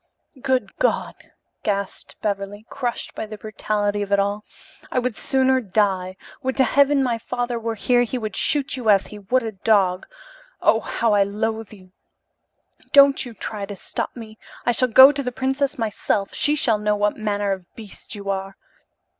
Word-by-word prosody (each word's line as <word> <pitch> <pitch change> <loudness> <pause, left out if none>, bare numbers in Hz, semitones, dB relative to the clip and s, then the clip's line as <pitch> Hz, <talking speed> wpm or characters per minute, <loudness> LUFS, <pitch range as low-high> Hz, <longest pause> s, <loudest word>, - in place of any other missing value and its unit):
"Good 260 -1 -1
God!" - - 0 0.5
gasped 200 -2 -3
Beverly, 205 +1 -3
crushed 245 -3 -3
by 220 - -5
the 215 0 -8
brutality 205 0 -2
of 200 0 -4
it 200 - +4
all. 200 +1 -1 0.5
"I - - -2
would 250 -2 0
sooner 260 +1 +2
die. 190 -3 0 0.2
Would 260 -1 -2
to 265 - +5
heaven 280 0 +3
my 235 -3 0
father 245 0 -3
were 230 0 -3
here, 245 +3 +2
he 245 +1 -1
would 215 -4 -5
shoot 280 -1 0
you 245 -4 -2
as 195 -2 +5
he 210 - -10
would 245 +6 0
a 225 - -3
dog! 195 -3 +1 0.5
Oh, - - +4
how 230 -2 0
I 205 - +4
loathe 220 +2 -2
you! 185 -3 -15 1.0
Don't 280 -2 +6
you 235 - -10
try 205 0 -5
to 205 - -6
stop - - -4
me! 220 -2 -10 0.3
I 240 - +3
shall 255 +2 +2
go 260 +4 +9
to 285 -1 -3
the 250 -2 -3
princess 270 +3 -1
myself. 215 -3 -1
She 295 - +2
shall 230 -7 +2
know 210 0 +1
what 205 0 +1
manner 205 -2 -1
of 190 -2 -5
beast 215 0 -9
you 200 -1 -9
are." 195 0 -5
220 Hz, 180 wpm, -22 LUFS, 205-255 Hz, 1.0 s, go